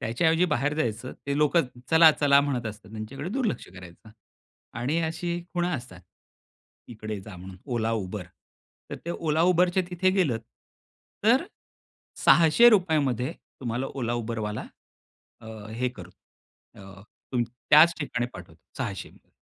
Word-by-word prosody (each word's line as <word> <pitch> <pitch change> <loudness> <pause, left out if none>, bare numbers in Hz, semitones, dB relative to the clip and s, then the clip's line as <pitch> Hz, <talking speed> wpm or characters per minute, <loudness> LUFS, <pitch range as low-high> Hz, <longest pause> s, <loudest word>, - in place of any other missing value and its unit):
त्याच्या 120 +9 +1
ऐवजी 165 +2 +3
बाहेर 145 -3 0
जायचं, 120 -4 -2
ते 140 0 -1
लोकच 150 +1 +3 0.3
चला-चला 155 -3 +6
म्हणत 135 -4 -2
असतात 105 -2 -9
त्यांच्याकडे 120 +9 -6
दुर्लक्ष 245 -2 -2
करायचं. 90 +3 -13 0.7
आणि 145 +8 0
अशी 170 +2 -2
खुणा 175 0 0
असतात. 120 - -8 0.9
इकडे 110 -3 -6
जा 95 -1 -11
म्हणून 95 +1 -10 0.2
Ola, 115 -1 0
Uber. 95 0 -6 0.7
तर - - -4
ते 170 - -3
Ola, 160 -1 0
Uber 180 0 +4
तर 175 - -5
ते 190 - +4
तिथे 185 +1 +2
गेलत. 165 - +1 0.8
तर 250 +8 +4 0.8
₹600मध्ये 160 - +5 0.3
तुम्हाला 125 +1 -2
Ola, 120 -3 -1
Uberवाला 110 -2 -4 0.7
अ, 110 - -13 0.3
हे 125 +2 0
करू 90 -8 -11 0.6
अ, 95 0 -13 0.3
तुम 125 -2 +2
त्याच 150 +8 +5
ठिकाणी 120 -5 -2
पाठवतो 85 -2 -12 0.2
600 105 -8 -6
130 Hz, 135 wpm, -26 LUFS, 110-165 Hz, 0.9 s, चला-चला